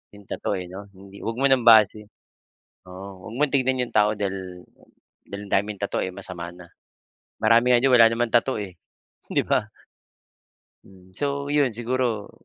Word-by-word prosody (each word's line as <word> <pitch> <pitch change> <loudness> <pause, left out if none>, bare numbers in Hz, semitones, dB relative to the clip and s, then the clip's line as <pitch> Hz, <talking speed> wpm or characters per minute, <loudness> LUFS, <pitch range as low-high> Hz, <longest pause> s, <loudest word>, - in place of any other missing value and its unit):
yung 100 - -15
tattoo, - - -3
eh, 90 - -7
'no? 100 +3 -10
Hindi, 100 +1 -14
'wag 115 +1 -4
mo 140 - +4
ng 135 -3 +3
base 110 -2 +6 0.9
oo 95 +1 -10
huwag 110 - -8
mong 150 +2 +1
tignan 130 -2 +1
yung 120 - -4
tao 105 0 +3
dahil 95 -3 -5 0.6
dahil 100 0 -8
ang - - -13
daming 105 +1 -4
tattoo, 100 - -2
eh, 95 - -6
masama 90 -3 -7
na. 90 -1 -15 0.7
Marami 115 +3 +4
nga - - +6
diyan 135 - +3
wala 115 -2 +8
naman 120 0 -1
tattoo, 120 -2 +1
eh, 90 -4 -10 0.5
'di - - +2
ba? - - +1 1.2
Hmm, 95 -1 -19
so 140 +5 -3
'yon, 145 -6 +2
siguro 120 -2 -2
105 Hz, 175 wpm, -24 LUFS, 95-125 Hz, 1.2 s, wala